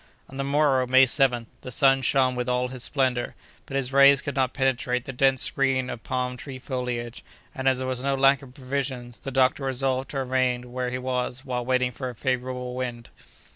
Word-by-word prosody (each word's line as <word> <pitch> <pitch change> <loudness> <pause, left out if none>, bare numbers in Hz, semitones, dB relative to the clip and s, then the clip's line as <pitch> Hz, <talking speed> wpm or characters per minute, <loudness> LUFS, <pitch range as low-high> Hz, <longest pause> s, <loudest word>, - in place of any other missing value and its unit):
On 135 - -11
the 135 - -1
morrow, 140 -2 +2
May 130 +1 +6
7th, 125 -3 +2 0.2
the 125 - -8
sun 135 +2 +4
shone 130 0 +2
with 125 0 -3
all 125 0 0
his 130 -2 -8
splendor, 130 -3 0 0.3
but 135 - -3
his 135 -1 -2
rays 140 0 +6
could 140 - -4
not 130 -2 +1
penetrate 130 -2 0
the 135 - -6
dense 135 0 +3
screen 135 -2 +1
of 115 - -7
the - - -18
palm 125 -1 -1
tree 130 +2 -8
foliage, 125 -2 -4 0.3
and 135 0 -3
as 130 - +1
there 130 0 -3
was 130 0 -2
no 140 0 +1
lack 135 0 +4
of 130 -2 -14
provisions, 130 -3 -4
the - - -6
doctor 130 +1 +2
resolved 130 0 -1
to 140 - -4
remain 125 -2 0
where 125 0 -2
he 125 - -3
was 125 +1 -3
while 125 -2 -2
waiting 125 0 +1
for 130 +1 -5
a 125 - -9
favorable 125 0 -3
wind. 120 -2 -5
130 Hz, 215 wpm, -25 LUFS, 125-135 Hz, 0.3 s, May